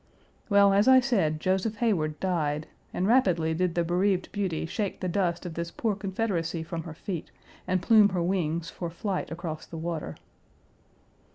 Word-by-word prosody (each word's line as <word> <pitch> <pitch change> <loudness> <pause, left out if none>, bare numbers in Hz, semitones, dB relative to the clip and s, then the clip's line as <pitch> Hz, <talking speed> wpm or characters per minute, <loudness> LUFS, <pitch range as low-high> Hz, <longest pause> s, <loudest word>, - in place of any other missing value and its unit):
Well, 200 -1 +6
as 200 +3 +4
I 260 0 +8
said, 195 - +1
Joseph 190 +5 0
Heyward 175 -10 0
died, 155 -5 -1 0.3
and 180 - -1
rapidly 185 -9 +3
did 175 +1 0
the 170 - +2
bereaved 180 +2 +1
beauty 190 -7 -2
shake 200 +4 -3
the 185 - -2
dust 175 -1 -1
of 175 - -5
this 170 +1 -4
poor 220 +3 -1
Confederacy 190 -5 -2
from 165 0 -5
her 160 -2 -8
feet 175 0 -5 0.4
and 185 -1 0
plume 215 0 +6
her 180 -3 -1
wings 170 -3 -1
for 170 - -5
flight 185 +3 -3
across 165 -2 -6
the 165 - -8
water. 165 -1 -4
180 Hz, 170 wpm, -27 LUFS, 165-200 Hz, 0.4 s, I